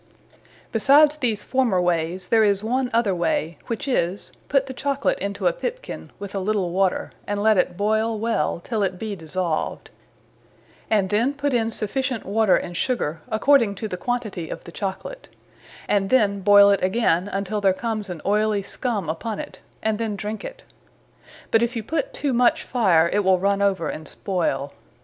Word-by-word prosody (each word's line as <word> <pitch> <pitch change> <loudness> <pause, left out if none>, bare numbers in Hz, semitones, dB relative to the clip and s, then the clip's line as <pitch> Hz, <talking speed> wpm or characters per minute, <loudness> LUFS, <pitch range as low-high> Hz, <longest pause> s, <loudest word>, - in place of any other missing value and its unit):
Besides 290 +6 +5
these 230 -7 -1
former 255 -8 +1
wayes, 175 +1 -1
there 225 -1 +5
is 200 -1 +2
one 250 +3 0
other 225 -4 +2
way; 170 -2 -1
which 230 +4 -4
is, 190 -7 -1 0.2
put 275 -2 +3
the 265 - -7
Chocolate 280 +2 -1
into 200 +1 -4
a - - +4
pipkin, - - -6
with 200 -1 -8
a 195 - -1
little 195 -2 -1
water; 190 0 0 0.2
and 205 0 -1
let 220 0 +5
it 180 -2 +1
boyle 220 +2 +1
well, 220 -8 0
till 225 -3 -2
it 185 -2 -1
be 215 +1 -4
dissolved; 165 -1 -3 1.0
and 200 -4 +2
then 235 +7 +1
put 285 -1 -1
in 225 -2 +1
sufficient 250 +2 -2
water 210 0 +3
and 175 - -5
Sugar, 165 - -1
according 230 -2 +3
to 220 - -4
the 185 - -4
quantity 215 -5 -3
of - - -7
the 170 - -11
Chocolate; 200 - -6 0.6
and 195 -1 +1
then 205 -6 +3
boyle 200 +1 +7
it 200 - +2
againe, 185 -2 +1
untill 200 +1 -2
there 195 -1 +4
comes 215 +1 -3
an 175 -3 -7
oyly 210 0 +1
scumme 210 - -3
upon 200 +7 -3
it; - - -8 0.2
and 220 -1 0
then 220 -2 -2
drinke 210 +2 -5
it. - - -8 0.9
But 225 - +4
if 235 +1 0
you 225 - -3
put 330 - -2
too 290 - -2
much 245 0 +3
fire, 185 -10 +3
it 205 - +3
will 190 -2 +3
runne 200 +2 +1
over, 195 -4 +1
and 155 - -6
spoyle. 145 -8 -2
210 Hz, 180 wpm, -23 LUFS, 190-235 Hz, 1.0 s, boyle